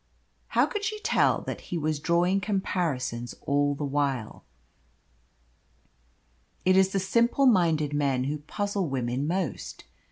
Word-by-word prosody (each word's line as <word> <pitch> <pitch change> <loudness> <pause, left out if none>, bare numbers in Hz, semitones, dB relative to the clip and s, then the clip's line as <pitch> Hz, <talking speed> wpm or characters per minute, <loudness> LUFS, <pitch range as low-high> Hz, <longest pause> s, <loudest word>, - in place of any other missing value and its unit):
How - - +6
could 415 -3 -4
she 430 0 -2
tell - - +2
that - - -6
he 175 - -2
was 155 -1 -1
drawing 175 +5 +2
comparisons 165 - -2
all 145 0 +1
the 145 - -3
while? 135 -5 -2 2.2
It 185 0 +5
is 190 0 +5
the 195 - -1
simple 235 +7 +2
minded 165 - +3
men 140 -3 +1
who 145 +3 -2
puzzle 200 +3 -2
women 130 +1 -2
most. 180 +1 -3
160 Hz, 130 wpm, -27 LUFS, 140-190 Hz, 2.2 s, How